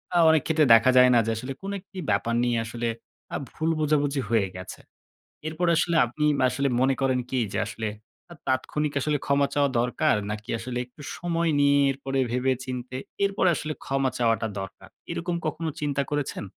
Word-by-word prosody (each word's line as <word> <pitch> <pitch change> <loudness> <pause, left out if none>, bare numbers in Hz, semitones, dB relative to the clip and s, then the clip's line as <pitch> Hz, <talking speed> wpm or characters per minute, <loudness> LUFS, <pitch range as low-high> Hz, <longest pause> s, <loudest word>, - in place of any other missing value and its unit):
আ - - +5
অনেক 160 -2 +4
ক্ষেত্রে 160 -2 +3
দেখা 115 +3 +6
যায় 125 0 +8
না? 120 - +6
যে 115 - 0
আসলে, 130 +3 -5
কোনো 200 +1 -4
একটি 195 0 -16
ব্যাপার 115 - +1
নিয়ে 120 -1 +1
আসলে 120 +1 -3 0.5
আ - - -1 0.2
ভুল 160 +1 -1
বোঝাবুঝি 145 -2 +1
হয়ে 110 -4 +2
গেছে। 90 0 -8 0.7
এরপরে 170 +2 0
আসলে 170 0 +1
আপনি 150 +6 -2
মা - - +2
আসলে 140 0 0
মনে 135 +1 +3
করেন 130 -1 +2
কি? 130 - 0
যে - - -1
আসলে, 110 0 -4 0.4
আ - - -7
তাৎক্ষণিক 145 +3 -1
আসলে 150 +2 0
ক্ষমা 140 0 +3
চাওয়া 145 -1 +2
দরকার, 120 -2 +2 0.2
নাকি 105 0 -7
আসলে 120 +1 -5
একটু 125 +4 -17 0.2
সময় 170 -1 0
নিয়ে, 140 0 +4
এরপরে, 135 0 -3
ভেবে-চিন্তে, 130 0 -2 0.3
এরপরে 195 -2 +2
আসলে 155 0 -3
ক্ষমা 135 -1 +1
চাওয়াটা 115 -2 +1
দরকার। 95 0 -9 0.2
এরকম 175 0 -2
কখনো 165 -1 -2
চিন্তা 140 -1 0
করেছেন? 145 -6 -2
135 Hz, 180 wpm, -26 LUFS, 125-155 Hz, 0.7 s, যায়